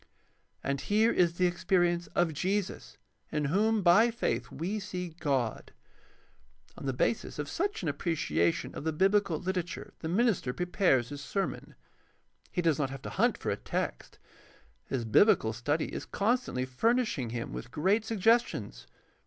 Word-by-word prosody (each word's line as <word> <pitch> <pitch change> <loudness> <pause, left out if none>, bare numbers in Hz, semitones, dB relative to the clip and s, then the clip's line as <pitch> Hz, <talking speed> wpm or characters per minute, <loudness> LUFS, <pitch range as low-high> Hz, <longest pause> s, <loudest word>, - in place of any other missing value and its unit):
And 140 0 -1
here 220 +3 +3
is 170 -5 +2
the 185 - +3
experience 175 -1 +1
of 175 -2 +2
Jesus 190 +5 -2 0.3
in 150 -1 0
whom 210 +7 +2
by 205 +7 +6
faith 235 +1 -2
we 190 +7 -3
see 180 -3 -5
God. 140 -8 -2 1.0
On - - -7
the - - +2
basis 150 - -1
of 145 -1 -3
such 395 - -2
an - - -2
appreciation 145 - 0
of - - -6
the 160 0 -1
biblical 195 0 +2
literature 185 0 -4
the 160 - -4
minister 195 - +1
prepares 175 - +2
his 145 -1 -7
sermon. 195 -1 -3 0.8
He 180 - -1
does 160 -4 +2
not 140 -2 0
have 135 -1 -8
to - - -6
hunt - - +2
for - - -2
a - - 0
text. - - -4 0.7
His 125 -4 -3
biblical 110 - +4
study 145 +8 -1
is - - -5
constantly 215 - 0
fur 220 - +2
nishing 225 - -1
him 115 0 -4
with 120 - -6
great 190 - +1
suggestions. 225 +2 +1
175 Hz, 155 wpm, -30 LUFS, 140-205 Hz, 1.0 s, by